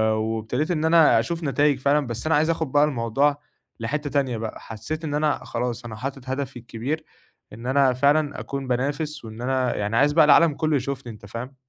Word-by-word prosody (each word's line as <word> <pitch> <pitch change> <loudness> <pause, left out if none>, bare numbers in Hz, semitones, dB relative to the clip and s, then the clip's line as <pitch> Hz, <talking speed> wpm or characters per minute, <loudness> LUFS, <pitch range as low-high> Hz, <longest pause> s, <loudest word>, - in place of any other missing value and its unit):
وابتديت 110 +8 -2
إن 160 -1 0
أنا 160 -7 +6
أشوف 165 +9 -3
نتايج 145 -1 +2
فعلًا 140 0 +2
بس 120 +3 -5
أنا 160 - +3
عايز 155 +2 +2
آخد 160 -4 -1
بقى 145 0 +4
الموضوع 140 +1 +1 0.4
لحتّة 145 +6 -3
تانية 135 -5 0
بقى، 110 0 -5
حسّيت 115 +9 -6
إن 145 -2 -3
أنا 150 0 0
خلاص، 120 0 -3
أنا 110 -2 -7
حاطط 130 +2 -6
هدفي 130 -2 -3
الكبير، 125 +7 -4 0.5
إن 115 +3 -8
أنا 135 -1 +3
فعلًا 145 +3 +2
أكون 140 -1 -5
بانافس، 145 +3 -2
وإن 110 +1 -9
أنا 130 -1 0
يعني 105 +2 -1
عايز 145 +3 +4
بقى 160 -1 +6
العالم 150 +1 +6
كله 155 -2 0
يشوفني 130 -2 -4
أنت 105 - -14
فاهم؟ 120 +6 -7
135 Hz, 195 wpm, -24 LUFS, 120-150 Hz, 0.5 s, أنا